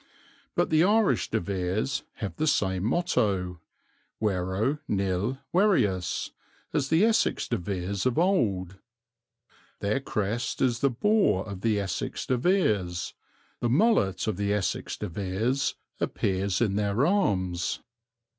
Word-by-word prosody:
But - - +1
the 155 +1 +5
Irish 205 - +3
De - - +1
Veres 95 +7 -1
have 100 -8 -6
the 155 - 0
same 95 -9 +1
motto 100 - 0 0.6
Vero 100 +7 0
nil 100 +5 0 0.2
Verius 125 - +2 0.4
as 140 -3 0
the 165 +6 +4
Essex 225 -1 +2
De 120 - 0
Veres 95 +3 -2
of 125 - 0
old; 100 - +1 1.0
their 105 +6 0
crest 115 -2 -2
is 120 -3 +2
the 140 - +3
boar 135 - +2
of 100 -2 -7
the 110 -1 +1
Essex 95 -2 -3
De 130 - +1
Veres; 105 - +1 0.5
the 120 - 0
mullet 120 - +3
of 110 -5 -1
the 100 0 0
Essex 105 -2 -1
De - - -4
Veres 100 +9 -1 0.2
appears 95 0 -1
in 100 -4 +1
their 105 +5 +1
arms. 95 - 0
105 Hz, 130 wpm, -27 LUFS, 95-135 Hz, 1.0 s, the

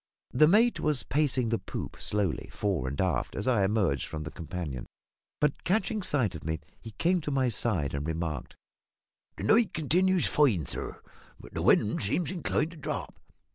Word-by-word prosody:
The 150 +5 +5
mate 225 +7 +4
was 150 -6 +2
pacing 130 -4 +1
the 115 - 0
poop - - -6
slowly, 100 -5 -1
fore 95 -10 -1
and 70 +2 -4
aft, 85 -10 0
as 100 - -3
I 120 -6 +3
emerged 95 -8 +1
from 75 -1 -5
the 75 - -6
companion; 80 -7 -5 0.5
but, 150 -1 0
catching 215 +3 +1
sight 130 - 0
of 80 - -8
me, 80 0 -2 0.2
he 115 - -8
came 175 - +1
to 150 - -4
my 135 -3 +2
side 95 - -1
and 70 +2 -3
remarked 80 -4 -3 0.8
"The - - -6
night 225 -1 +3
continues 180 +4 +2
fine, 115 - +3
sir, - - -5 0.4
but - - -13
the - - -2
wind 105 - +3
seems 145 - 0
inclined 170 -2 -1
to 170 - -12
drop. 150 - -5
115 Hz, 175 wpm, -29 LUFS, -, 0.8 s, The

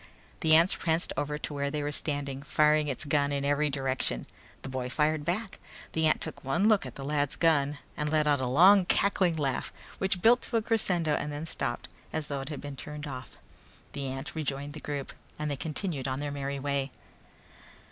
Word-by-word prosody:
The 155 -1 +5
ant 170 +4 +5
pranced 165 +1 0
over 150 +1 -1
to 150 - -5
where 140 0 -1
they 150 0 -2
were 145 - -1
standing, 140 -2 -2
firing 150 +1 +3
its 140 +2 -3
gun 145 0 +2
in 140 0 -1
every 145 +1 +2
direction. 135 -2 -1 0.4
The - - -5
boy 130 -1 -3
fired 150 +3 +1
back. 190 +6 -2 0.3
The 160 0 +2
ant 155 - +2
took - - -6
one 140 +10 +2
look 210 -10 +4
at 125 - -10
the 135 - -7
lad's 145 -1 0
gun 145 -3 +2 0.2
and 150 0 -1
let 155 0 +2
out 145 -2 +3
a 130 - 0
long 185 +9 +7
cackling 185 -3 +2
sound 140 -3 0 0.3
which 190 -2 0
built 240 +2 +6
to 235 - -1
a - - +2
crescendo 180 -9 +1
and 150 - -1
then 145 +2 -4
stopped 120 -6 0 0.2
as 155 -1 -3
though 140 -1 -2
it 135 - -7
had 150 - -5
been 145 -1 -6
turned 150 +2 -7
off. 130 -3 -8 0.6
The 140 -1 -3
ant 135 +2 -5
rejoined 145 -2 -3
the 155 - -7
group 145 -2 -5 0.2
and 150 -1 -2
they - - 0
continued 155 -1 -3
on 130 0 -2
their 145 0 -3
merry 140 0 -3
way. 140 0 -1
145 Hz, 210 wpm, -29 LUFS, 140-160 Hz, 0.6 s, long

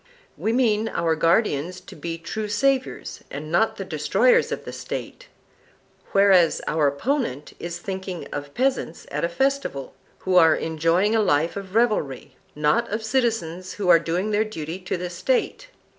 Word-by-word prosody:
We 220 - -1
mean 225 -3 +2
our 165 -4 0
guardians 170 0 +1
to 185 - -13
be 165 +2 -5
true 210 +6 -4
saviours 260 +5 -1
and 150 +3 -7
not 195 +7 +2
the - - -5
destroyers 475 -2 +2
of - - -4
the - - -7
State, - - -6 0.8
whereas 195 -4 +5
our 155 -1 +2
opponent 150 - -2
is 170 0 -5
thinking 190 -3 -5
of 145 0 -6
peasants 255 -9 -1
at - - -2
a 170 - +1
festival, 265 - -1 0.3
who 185 -1 +2
are 160 -2 +7
enjoying 165 +6 +1
a 220 - +4
life 165 -4 +1
of 195 0 -7
revelry, 215 - 0 0.2
not 150 +11 +1
of 215 +2 -3
citizens 220 -7 -1
who 195 -3 -2
are 165 - +8
doing 175 +5 -1
their 210 +1 +3
duty 170 -5 -6
to 180 -1 -3
the 180 0 -5
State. - - -1
185 Hz, 160 wpm, -24 LUFS, 165-225 Hz, 0.8 s, are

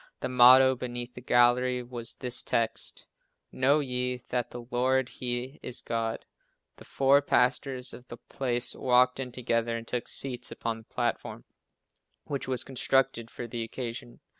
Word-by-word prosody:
The - - -2
motto, 130 +1 +7
beneath 120 -1 -5
the 125 - -10
gallery, 125 +1 +3
was 120 -1 -5
this 125 -1 0
text: 115 -1 -1 0.5
"Know 140 +4 +3
ye 125 -2 -2
that 125 -1 -1
the 120 -1 -8
Lord 130 +1 +1
He 125 +2 -4
is 125 - -1
God." 115 -1 -3 0.5
The - - -13
four 135 +1 +4
pastors 130 -1 +1
of 125 +1 -12
the 120 - -9
place 120 -1 -2
walked 125 0 +3
in 130 -2 -4
together 115 -1 -1
and 115 0 -9
took 125 -1 -3
seats 125 -2 -3
upon 115 -1 -3
the - - -15
platform, 120 0 -3 0.8
which 140 -3 -4
was 130 -2 -2
constructed 135 -2 0
for 120 - -7
the 115 0 -5
occasion. 120 +1 -6
125 Hz, 155 wpm, -28 LUFS, 120-130 Hz, 0.8 s, motto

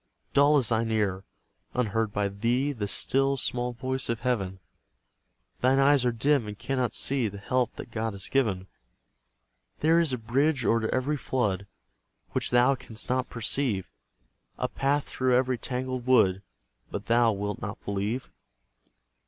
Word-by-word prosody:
Dull 145 +1 +5
is 130 -5 +2
thine 115 0 +1
ear, 100 -4 0 0.5
unheard 115 -2 0
by 100 0 0
thee 120 +8 0
The 110 -7 -3
still, 135 +6 +1
small 125 -1 0
voice 130 +2 -3
of 115 -1 -1
Heaven; 95 -7 -1 1.0
Thine 130 +2 +3
eyes 135 -1 +4
are - - +2
dim 130 +1 +1
and 105 -1 -7
cannot 130 -1 -1
see 135 -4 +2
The 100 -1 -7
helps 125 +4 -1
that - - -9
God 110 -1 -2
has 100 -1 -2
given. 105 -9 0 1.2
There 160 +2 +4
is 165 -4 +2
a 130 - -1
bridge 130 +4 +1
o'er 115 -1 +2
every 135 +4 0
flood 105 -8 -1 0.6
Which - - 0
thou 125 +2 +4
canst 115 -4 -6
not 130 0 0
perceive; 115 -4 -1 0.7
A 125 - -1
path 140 +3 0
through 130 -1 0
every 130 -1 +1
tangled 130 0 -3
wood, 95 -7 +4 0.5
But 100 - -5
thou 115 0 +4
wilt 105 0 -4
not 100 - -5
believe. 100 +5 -2
120 Hz, 155 wpm, -27 LUFS, 105-130 Hz, 1.2 s, Dull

